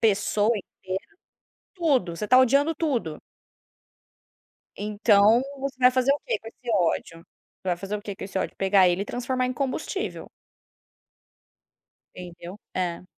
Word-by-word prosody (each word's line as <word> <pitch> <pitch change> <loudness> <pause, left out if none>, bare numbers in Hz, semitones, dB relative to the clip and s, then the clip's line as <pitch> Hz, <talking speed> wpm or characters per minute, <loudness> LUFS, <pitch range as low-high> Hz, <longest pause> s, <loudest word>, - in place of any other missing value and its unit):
pessoa 210 0 +2
inteira, 190 - -7 0.6
tudo 270 - +1
você 210 - -3
está 255 +4 +5
odiando 280 +5 +4
tudo. 250 - -2 1.6
Então 210 +2 +4 0.2
você 275 -1 -4
vai 250 0 +6
fazer 255 +2 +3
o 290 - -1
que - - +1
com 225 - -10
esse 240 +1 -8
ódio? 165 -2 0
Você 180 +2 -14
vai 175 - +1
fazer 195 +4 -4
o 205 - -9
que 205 -1 -6
com - - -7
esse 195 0 -4
ódio, - - -3
pegar 190 -1 +4
ele 175 +2 0
e - - -4
transformar 250 +3 -2
em 255 - -2
combustível. 280 +10 -3 1.9
Entendeu, 175 +2 -9 0.2
é. 180 -1 -2
210 Hz, 145 wpm, -25 LUFS, 190-255 Hz, 1.9 s, vai